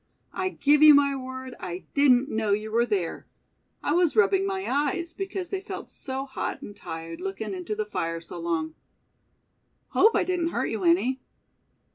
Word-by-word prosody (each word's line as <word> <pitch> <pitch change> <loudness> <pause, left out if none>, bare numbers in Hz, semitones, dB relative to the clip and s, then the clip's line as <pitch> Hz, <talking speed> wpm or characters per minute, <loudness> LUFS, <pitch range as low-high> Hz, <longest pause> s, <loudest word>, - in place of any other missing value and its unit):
"I 370 0 -1
give 295 -4 +3
you 305 -1 +10
my 280 -1 +3
word 260 -1 -7
I 180 +1 -6
didn't 275 -2 +4
know 220 -6 0
you 215 +1 -2
were 235 +2 +2
there. 190 -6 -2 0.6
I - - +1
was 345 -2 +3
rubbing 395 -3 +4
my 385 0 -2
eyes, 295 +5 -1
because 385 -2 -5
they 390 -1 -2
felt 400 - -7
so 265 0 -4
hot 265 -1 -4
and 205 - -9
tired, 165 -3 -7
lookin' 195 +2 -4
into 185 +3 -4
the 215 0 -2
fire 165 -5 -3
so 170 +1 -8
long. 165 -2 -2 1.2
Hope 445 - +4
I - - +3
didn't 355 -2 0
hurt - - -1
you 220 -4 -3
any?" 205 +10 +2
260 Hz, 175 wpm, -26 LUFS, 195-330 Hz, 1.2 s, you